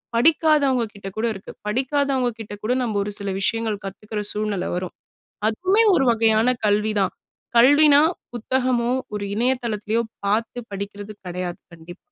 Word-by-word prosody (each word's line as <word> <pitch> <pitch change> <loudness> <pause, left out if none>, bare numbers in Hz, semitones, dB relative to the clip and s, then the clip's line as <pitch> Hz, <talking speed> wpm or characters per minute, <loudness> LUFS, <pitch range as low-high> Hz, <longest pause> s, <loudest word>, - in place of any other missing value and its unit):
படிக்காதவங்க 290 -1 +3
கிட்ட 200 -2 -9
கூட 220 - 0
இருக்கு. 195 -1 -10 0.2
படிக்காதவங்க 265 +2 0
கிட்ட 215 -2 -7
கூட 230 +4 +1
நம்ப 225 -4 -2
ஒரு 205 - -4
சில 200 -1 -4
விஷயங்கள் 220 0 -1
கத்துக்கிற 210 +2 -5
சூழ்நிலை 210 -3 -2
வரும். 180 0 -4 0.5
அதுவுமே 375 - +2
ஒரு 270 - +2
வகையான 225 +1 +3 0.2
கல்வி 210 +1 +2
தான். 195 - 0 0.4
கல்வினா 290 +4 +7 0.3
புத்தகமோ, 245 0 0 0.3
ஒரு 205 -1 -3
இணைய 245 +4 +2
தளத்திலயோ 215 0 -1 0.2
பார்த்து 220 +4 0
படிக்கிறது 200 +1 -6
கெடையாது. 180 0 -4 0.2
கண்டிப்பா. 170 +2 -12
220 Hz, 140 wpm, -22 LUFS, 205-255 Hz, 0.5 s, கல்வினா